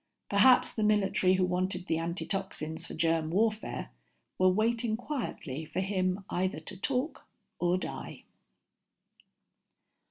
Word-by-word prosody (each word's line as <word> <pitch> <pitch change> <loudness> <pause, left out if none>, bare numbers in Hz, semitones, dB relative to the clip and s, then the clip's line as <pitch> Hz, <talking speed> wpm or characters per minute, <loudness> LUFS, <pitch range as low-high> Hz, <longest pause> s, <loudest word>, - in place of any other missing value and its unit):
Perhaps 230 +6 +6
the 220 - -3
military 195 -3 +3
who 185 0 +3
wanted 180 0 -1
the 160 -2 0
antitoxins 170 -2 -3
for - - -7
germ 165 -1 +1
warfare 215 - 0 0.5
were 185 0 +6
waiting 225 +3 +1
quietly 220 - -4
for 160 - -4
him 190 0 0
either 185 -3 -1
to 160 - -9
talk 260 - -2 0.3
or 175 +1 +2
die. - - -6
185 Hz, 120 wpm, -30 LUFS, 175-215 Hz, 0.5 s, Perhaps